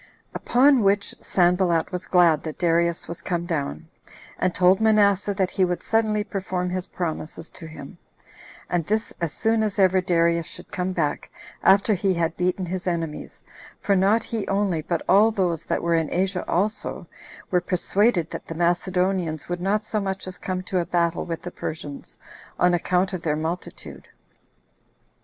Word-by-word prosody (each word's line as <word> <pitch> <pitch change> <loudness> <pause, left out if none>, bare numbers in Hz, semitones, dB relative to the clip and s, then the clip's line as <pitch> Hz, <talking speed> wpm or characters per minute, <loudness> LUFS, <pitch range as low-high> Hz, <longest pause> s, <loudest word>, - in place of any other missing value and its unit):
Upon 265 +1 +4
which 200 0 +1
Sanballat 175 -2 +2
was 180 -1 -5
glad 170 -4 +4
that 155 -2 -6
Darius 170 -1 +1
was 170 - -7
come 170 -1 -2
down; 160 -1 -3 0.5
and 185 - +2
told 185 +2 +4
Manasseh 205 -2 +3
that 190 -1 0
he 190 - +1
would 180 -1 -1
suddenly 215 -2 +1
perform 185 -3 -3
his 185 0 -3
promises 165 -1 -5
to 165 - -10
him, 150 -3 -11 0.7
and 175 -1 0
this 215 +5 -2
as 170 -3 -1
soon 225 0 +1
as 215 -2 -1
ever 190 -1 +4
Darius 170 -2 +1
should - - -11
come 180 +1 -2
back, 160 -6 -2 0.3
after 200 +2 +4
he 190 -1 +1
had 165 -1 -1
beaten 180 +1 -1
his 185 +1 -4
enemies; 165 -3 -4 0.4
for 200 - +1
not 200 +4 +3
he 225 -3 -4
only, 195 -5 0
but 165 +1 -2
all 205 +4 +6
those 180 -7 -1
that - - -1
were 170 0 +1
in 160 -2 +1
Asia 185 0 0
also, 205 +5 -1 0.5
were 180 -1 +3
persuaded 180 0 +1
that - - -7
the 165 - -6
Macedonians 175 -1 0
would 175 0 -3
not 210 +3 0
so 215 -1 -1
much 195 0 -3
as 185 -3 -7
come 185 -1 -3
to 185 0 -1
a 170 - -1
battle 170 -1 0
with 165 -2 -5
the 175 - -6
Persians, 150 -4 -7 0.4
on 180 0 +3
account 180 +2 +1
of 185 - -3
their 150 -3 0
multitude. 160 +3 -6
180 Hz, 170 wpm, -24 LUFS, 170-195 Hz, 0.7 s, all